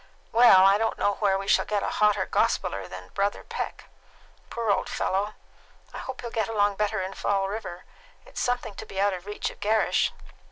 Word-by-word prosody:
Well, 225 -5 +7
I 195 +1 +5
don't 225 0 0
know 205 - +1
where 195 -2 +2
we 195 0 -6
shall - - +4
get 205 -1 -1
a - - -1
hotter 210 -1 +4
gospeller 100 -1 0
than 90 0 -10
Brother 200 +1 -1
Peck. - - -5 0.6
Poor 230 -3 -1
old - - 0
fellow! 205 +3 -1 0.6
I - - -6
hope 260 -1 -6
he'll 235 -1 -6
get 220 -1 -1
along 205 -2 +1
better 210 -2 0
in 190 +1 -5
Fall 195 -1 0
River. 195 -4 -6 0.4
It - - -17
is - - -5
something 245 -3 -1
to - - -7
be 195 - -6
out 200 0 +3
of 185 +1 -7
reach 210 - -3
of - - -17
Gerrish." 215 +1 +2
205 Hz, 205 wpm, -26 LUFS, 195-220 Hz, 0.6 s, Well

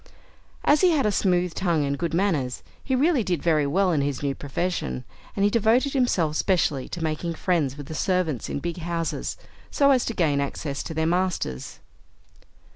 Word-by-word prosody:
As 295 - +4
he 370 - +6
had 305 -7 +2
a 210 - +3
smooth 180 -3 +1
tongue 170 -5 +1
and 140 0 -1
good 170 +3 -2
manners, 160 -10 0 0.2
he 265 - 0
really 285 -1 +3
did 175 -6 -2
very 155 -4 +2
well 185 +5 +2
in 150 -4 +1
his 140 -1 -2
new 140 -1 0
profession, 140 - -3 0.3
and 200 - 0
he 205 - +3
devoted 230 +5 +3
himself 185 - +1
specially 155 -8 +1
to 175 - -5
making 160 +2 -2
friends 155 -7 0
with 145 - -7
the 160 - -7
servants 165 - -1
in - - -2
big 170 +4 -4
houses, 170 -1 -3 0.3
so 280 -1 +4
as 255 -3 +3
to 230 - -3
gain 150 -6 +2
access 140 0 -3
to 160 - -6
their 160 0 +1
masters. 175 - -2
170 Hz, 190 wpm, -25 LUFS, 145-200 Hz, 0.3 s, he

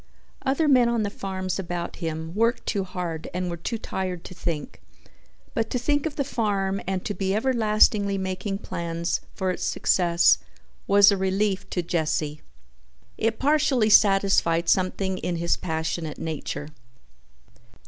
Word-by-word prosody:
Other 280 +4 +1
men 250 -4 +5
on 235 -2 +1
the 205 - -2
farms 190 -1 -4
about 175 -2 -4
him 160 -1 -4
worked 230 +4 +1
too 200 -2 0
hard 175 -3 -5
and 180 -1 -2
were - - -3
too 225 +8 -3
fired 185 -5 -4
to - - -9
think, 170 - -4 0.7
but 225 -1 -1
to - - -1
think 290 +5 +1
of 300 - -6
the 280 - 0
farm 200 -7 -1
and 190 -1 -2
to 205 - -1
be 195 -1 -1
everlastingly 215 -4 +3
making 190 +1 -3
plans 170 -3 -3
for 190 -1 0
its 180 - -5
success 170 -2 +3 0.5
was 200 +1 +7
a 200 - +1
relief 190 +1 0
to 180 - -2
Jesse. 155 -3 -1 0.8
It 225 0 +1
partially 275 -6 +2
satisfied 195 -5 +4
something 190 0 +1
in 175 - -2
his 170 0 +1
passionate 160 -2 -3
nature. 155 -1 -4
190 Hz, 150 wpm, -25 LUFS, 170-215 Hz, 0.8 s, was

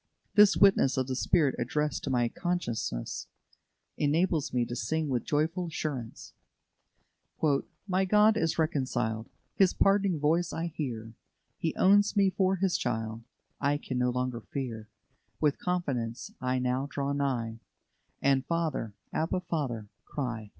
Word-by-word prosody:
This 205 -1 +6
witness 195 -10 +5
of 130 - +1
the 130 0 -3
Spirit 145 +1 +2
addressed 150 +5 -1
to - - -2
my 120 -2 +2
consciousness 120 - -3 0.7
enables 155 +1 +1
me 125 -1 +1
to 120 - -5
sing 150 +7 -1
with 125 -3 0
joyful 165 +4 0
assurance: 145 -8 -5 1.5
"My 190 0 +2
God 210 +3 +5
is 165 -7 0
reconciled; 125 -8 -1 0.2
His 190 -2 +3
pardoning 195 -4 +3
voice 160 +4 +1
I 165 0 -3
hear: 115 -6 -4 0.5
He 160 - -1
owns 205 +2 +4
me 195 -1 +4
for 190 +1 +2
His 190 -1 +1
child; 110 -2 -2 0.4
I 145 0 +2
can 130 -3 -4
no 125 0 +2
longer 125 -1 -2
fear: 115 -5 -5 0.5
With 150 -2 +2
confidence 140 - -2
I 130 0 0
now 125 +2 0
draw 140 0 -2
nigh, 120 -5 -1 0.6
And, 135 -1 +3
'Father, 160 -11 -1 0.2
Abba, 165 +3 0
Father,' 140 -11 -3 0.2
cry." 120 -7 -4
145 Hz, 135 wpm, -29 LUFS, 120-175 Hz, 1.5 s, This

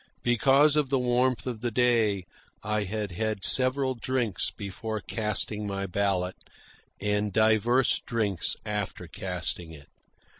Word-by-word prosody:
Because 135 +5 +4
of 150 -3 +2
the 135 - +2
warmth 125 0 +1
of 120 -4 -4
the 120 - 0
day 115 -5 +2 0.4
I 105 0 0
had 105 0 -3
had 110 +1 -1
several 130 +1 +2
drinks 120 -4 -1
before 110 +2 -5
casting 105 0 -2
my 100 0 -3
ballot, 95 -1 -1 0.6
and 105 0 0
divers 110 +4 +3
drinks 105 -7 -1
after 105 -2 -3
casting 85 -2 -3
it. 70 -2 -13
110 Hz, 125 wpm, -27 LUFS, 100-125 Hz, 0.6 s, Because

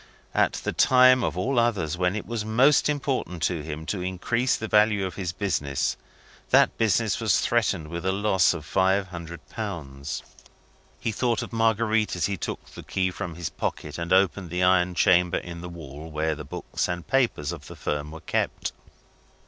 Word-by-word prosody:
At - - +3
the - - -3
time 130 -1 +6
of 80 +2 -1
all 120 +7 +1
others 100 -9 +1
when 90 +2 0
it 105 - -4
was 115 -2 -3
most 130 +8 +4
important 135 - -2
to 85 -4 0
him 75 +1 -6
to 95 +2 -3
increase 105 +7 0
the 110 - -4
value 105 -2 +3
of 95 - -4
his 90 -3 -3
business, 90 -8 -1 0.5
that - - +5
business 110 -1 +2
was 110 -4 +3
threatened 100 -9 +1
with 85 +1 -5
a 95 - +1
loss 95 -3 +3
of 80 -3 -7
five 95 +2 +2
hundred 85 -1 -8
pounds. 75 - -5 0.8
He 115 - -1
thought 115 +1 0
of - - -9
Marguerite, 110 -1 +2
as 90 - 0
he 100 - -1
took 90 - -5
the - - -11
key 95 -1 -1
from 85 -2 -5
his 85 0 -4
pocket 75 +1 -4
and 85 0 -4
opened 95 -1 +3
the 90 +2 -1
iron 90 -1 +3
chamber 90 0 +4
in 85 -1 -7
the 90 - -7
wall 80 -3 -9
in 80 - -12
which 80 +1 0
the 75 -1 -8
books - - -3
and 90 -1 -3
papers 120 - +1
of - - -8
the - - -9
firm 75 0 -3
were 80 +1 -9
kept. - - -2
95 Hz, 190 wpm, -26 LUFS, 85-110 Hz, 0.8 s, time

